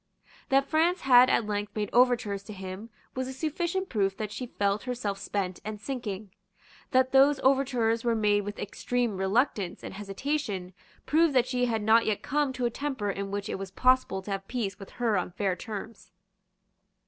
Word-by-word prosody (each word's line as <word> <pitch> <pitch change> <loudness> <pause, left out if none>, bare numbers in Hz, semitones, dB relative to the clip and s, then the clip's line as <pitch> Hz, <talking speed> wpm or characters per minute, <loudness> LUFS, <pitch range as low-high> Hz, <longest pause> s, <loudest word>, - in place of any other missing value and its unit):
That 275 0 +3
France 335 +3 +2
had 255 -1 +7
at 225 - +2
length 205 0 -3
made 210 -2 -2
overtures 240 -5 +3
to 215 - -8
him 190 +3 -7 0.2
was 260 0 -3
a 265 - -5
sufficient 345 +6 -2
proof 195 - 0
that 215 -1 -4
she 250 - -5
felt 200 -2 0
herself 235 -6 -3
spent 195 -3 -3
and 215 0 -5
sinking. 215 -5 -5 0.6
That 260 -1 +3
those 270 +1 +5
overtures 250 -4 +2
were 235 -1 +2
made 210 -2 +3
with 205 +1 -6
extreme 240 +2 -2
reluctance 195 0 0
and - - -6
hesitation 200 -1 -3 0.3
proved 315 -1 +3
that 250 - +5
she 250 -1 +1
had 225 -3 -1
not 225 +2 +5
yet 215 -2 0
come 290 -1 +1
to 250 -1 -2
a 240 - +1
temper 260 -6 -2
in 195 0 -4
which 200 +1 -3
it - - -4
was 195 0 -5
possible 255 -2 +2
to 200 - -6
have 195 0 -3
peace 210 -5 -3
with 195 - -10
her 230 -4 +1
on 180 0 -5
fair 195 -2 0
terms. 215 0 -8
225 Hz, 185 wpm, -28 LUFS, 200-260 Hz, 0.6 s, had